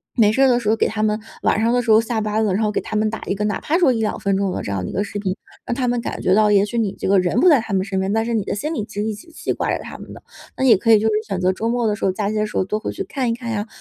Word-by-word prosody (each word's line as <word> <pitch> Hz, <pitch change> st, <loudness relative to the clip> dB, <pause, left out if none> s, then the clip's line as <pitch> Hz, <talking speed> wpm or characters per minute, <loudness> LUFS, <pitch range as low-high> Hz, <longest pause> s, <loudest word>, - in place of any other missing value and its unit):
没 215 Hz, -4 st, +4 dB
事 265 Hz, -, +1 dB
儿 270 Hz, -, +6 dB
的 245 Hz, -1 st, +3 dB
时 230 Hz, -, -6 dB
候 220 Hz, -, +4 dB
给 -, -, +1 dB
他 215 Hz, 0 st, -2 dB
们 215 Hz, 0 st, +1 dB, 0.2 s
晚 215 Hz, -, +2 dB
上 230 Hz, +1 st, +2 dB
的 245 Hz, -, +2 dB
时 230 Hz, -2 st, 0 dB
候 220 Hz, +1 st, +7 dB
下 230 Hz, 0 st, -2 dB
班 215 Hz, +1 st, 0 dB
了， 200 Hz, -, +1 dB
然 210 Hz, +4 st, 0 dB
后 210 Hz, -, +1 dB
给 -, -, -1 dB
他 215 Hz, -, -6 dB
们 215 Hz, 0 st, +1 dB
打 220 Hz, -, -6 dB
一 195 Hz, -, 0 dB
个， 210 Hz, +1 st, -2 dB
哪 205 Hz, -2 st, -1 dB
怕 320 Hz, -, +1 dB
说 340 Hz, -8 st, +4 dB
1-2 220 Hz, -2 st, -1 dB
分 200 Hz, -2 st, 0 dB
钟 195 Hz, -1 st, 0 dB
的 -, -, -3 dB
这 100 Hz, -, -4 dB
样 95 Hz, -2 st, -2 dB
的 -, -, -4 dB
一 -, -, -7 dB
个 200 Hz, -, 0 dB
视 205 Hz, 0 st, -5 dB
频， 190 Hz, -2 st, -2 dB, 0.3 s
让 240 Hz, -, -2 dB
他 255 Hz, -1 st, -1 dB
们 240 Hz, 0 st, 0 dB
感 -, -, -5 dB
觉 185 Hz, -, +3 dB
到， 210 Hz, +1 st, +4 dB
也 200 Hz, -1 st, +4 dB
许 235 Hz, +3 st, -3 dB
你 200 Hz, -4 st, -1 dB
这 -, -, -3 dB
个 195 Hz, 0 st, +4 dB
人 180 Hz, +5 st, +1 dB
不 365 Hz, -, +4 dB
在 295 Hz, -5 st, +6 dB
他 225 Hz, -, -8 dB
们 190 Hz, -1 st, +1 dB
身 195 Hz, -2 st, -2 dB
边， 190 Hz, +1 st, -1 dB
但 225 Hz, +1 st, +1 dB
是 235 Hz, -, -2 dB
你 220 Hz, -3 st, 0 dB
的 -, -, -3 dB
心 300 Hz, +10 st, -3 dB
里 255 Hz, -, -2 dB
其 -, -, -15 dB
实 205 Hz, -, -1 dB
一 220 Hz, -, -2 dB
直 210 Hz, +10 st, -12 dB
记 325 Hz, -, -3 dB
挂 -, -, -2 dB
着 -, -, -10 dB
他 -, -, -9 dB
们 -, -, -11 dB
的。 -, -, -13 dB, 0.3 s
那 -, -, -1 dB
也 235 Hz, -4 st, +7 dB
可 230 Hz, +4 st, +2 dB
以 220 Hz, -, +8 dB
就 220 Hz, -, +1 dB
是 220 Hz, -, +1 dB
选 195 Hz, -3 st, -2 dB
择 185 Hz, 0 st, +2 dB
周 225 Hz, +4 st, -2 dB
末 240 Hz, 0 st, 0 dB
的 210 Hz, -, +1 dB
时 -, -, -10 dB
候， 190 Hz, -, +3 dB
假 200 Hz, +1 st, -2 dB
期 215 Hz, -, -3 dB
的 215 Hz, 0 st, 0 dB
时 210 Hz, -, -5 dB
候 -, -, +2 dB
多 210 Hz, +3 st, -2 dB
回 -, -, -4 dB
去 390 Hz, -, -4 dB
看 270 Hz, -9 st, -2 dB
一 -, -, +1 dB
看 235 Hz, -1 st, -6 dB
呀， 210 Hz, 0 st, -2 dB
215 Hz, 420 characters per minute, -20 LUFS, 200-230 Hz, 0.3 s, 以